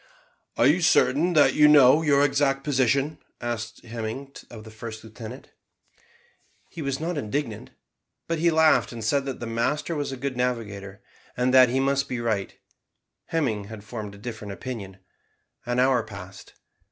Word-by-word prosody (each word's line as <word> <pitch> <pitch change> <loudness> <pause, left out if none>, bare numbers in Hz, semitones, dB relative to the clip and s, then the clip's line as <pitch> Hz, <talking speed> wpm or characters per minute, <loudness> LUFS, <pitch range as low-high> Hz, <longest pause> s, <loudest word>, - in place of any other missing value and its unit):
"Are - - +4
you 155 +7 +4
certain 160 +1 +3
that 150 -3 +5
you 150 - +6
know 150 0 +7
your 145 -2 +4
exact 135 -1 +1
position?" 135 +1 +1 0.2
asked 120 0 -5
Hemming 115 +4 -6 0.2
of 110 -2 -10
the 110 - -12
first 110 0 -8
lieutenant. 115 +3 -10 1.2
He 165 - -8
was 135 -2 -2
not 165 0 -2
indignant, 115 -2 -4 0.6
but 165 -1 -1
he 170 +1 +3
laughed 160 -1 +4
and 115 -2 -7
said 140 +5 +1
that 135 -2 -5
the 120 - -5
master 130 +8 -1
was 145 -2 -3
a 135 - -5
good 135 0 -3
navigator, 105 -5 -3 0.3
and 125 +1 +1
that 130 -2 +7
he 130 +2 0
must 140 +1 +1
be 125 - -3
right; 110 -4 -2 0.7
Hemming 120 -11 -1
had 105 0 -10
formed 105 -2 -7
a - - -13
different 110 -2 -7
opinion. 100 -5 -7 0.7
An 120 0 -1
hour 130 -1 +3
passed. 100 -3 -11
125 Hz, 165 wpm, -25 LUFS, 110-140 Hz, 1.2 s, know